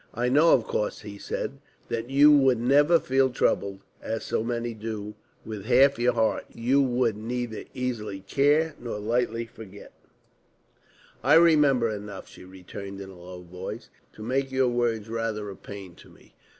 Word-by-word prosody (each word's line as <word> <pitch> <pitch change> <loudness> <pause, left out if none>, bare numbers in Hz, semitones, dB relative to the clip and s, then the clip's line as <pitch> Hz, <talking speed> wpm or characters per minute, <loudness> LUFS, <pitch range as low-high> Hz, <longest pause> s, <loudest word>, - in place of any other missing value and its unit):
"I 120 +2 0
know, 150 +6 +5
of 120 - +4
course," 105 - -2
he 105 -1 -9
said, - - -4 0.3
"that 115 +1 -3
you 145 +2 +6
would 135 -4 +4
never 145 +7 +4
feel 130 0 +2
trouble, 100 -5 0 0.2
as 110 0 -4
so - - -1
many 120 0 -3
do, 105 -1 -6 0.3
with 105 -3 -7
half 130 +2 +4
your 120 +1 +3
heart. 110 -1 0
You 125 +4 +2
would 125 -4 +1
neither 115 +1 -4
easily 115 -6 -4
care 145 +9 +2
nor 120 -3 -5
lightly 115 +2 -1
forget." 105 -3 -13 1.3
"I - - +5
remember 150 -7 +5
enough," 105 -2 -6
she - - -14
returned 95 +2 -9
in 95 -1 -8
a - - -13
low 90 0 -10
voice, 90 +6 -8 0.2
"to 110 - -10
make 135 +3 -1
your 130 -1 +2
words 120 -3 -1
rather 110 -2 -3
a - - -9
pain 100 -3 -10
to - - -16
me. - - -21
115 Hz, 165 wpm, -26 LUFS, 105-130 Hz, 1.3 s, you